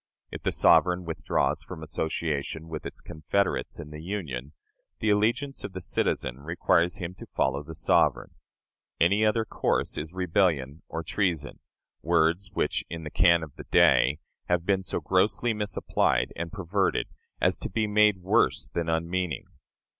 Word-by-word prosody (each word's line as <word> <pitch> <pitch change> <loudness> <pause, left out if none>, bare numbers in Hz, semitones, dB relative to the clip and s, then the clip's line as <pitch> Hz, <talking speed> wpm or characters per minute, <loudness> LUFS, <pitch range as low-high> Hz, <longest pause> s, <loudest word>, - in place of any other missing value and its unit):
If - - -7
the - - 0
sovereign 90 0 +4
withdraws 80 -1 0
from 80 - -9
association 80 0 -3
with 80 - -5
its - - -9
confederates 95 +5 -1
in 75 - -8
the 75 0 -8
Union, 80 -7 -5 0.5
the 110 - +2
allegiance 120 +7 +1
of 100 - -6
the 95 - -5
citizen 65 -6 -1
requires 85 +2 +1
him 90 -1 -5
to - - -9
follow 65 +1 +1
the 80 +2 -10
sovereign. - - +2 0.7
Any 100 +5 +4
other 110 +1 +2
course - - -1
is 80 +1 -6
rebellion 85 -6 0
or 80 - -4
treason 85 -4 -1 0.4
words 85 +3 +2
which, - - -1
in 80 0 -6
the 75 - -6
cant 85 -1 +4
of 75 -4 -9
the - - -9
day, 70 - +4 0.3
have 90 -1 0
been 95 -1 +2
so 95 - -3
grossly 95 +4 +2
misapplied 105 -1 0
and 85 -1 -4
perverted 95 0 0 0.3
as - - +3
to - - -5
be 110 +3 0
made 105 -1 +4
worse 95 - +2
than 85 -1 -1
unmeaning. 85 +1 -1
85 Hz, 155 wpm, -27 LUFS, 80-100 Hz, 0.7 s, sovereign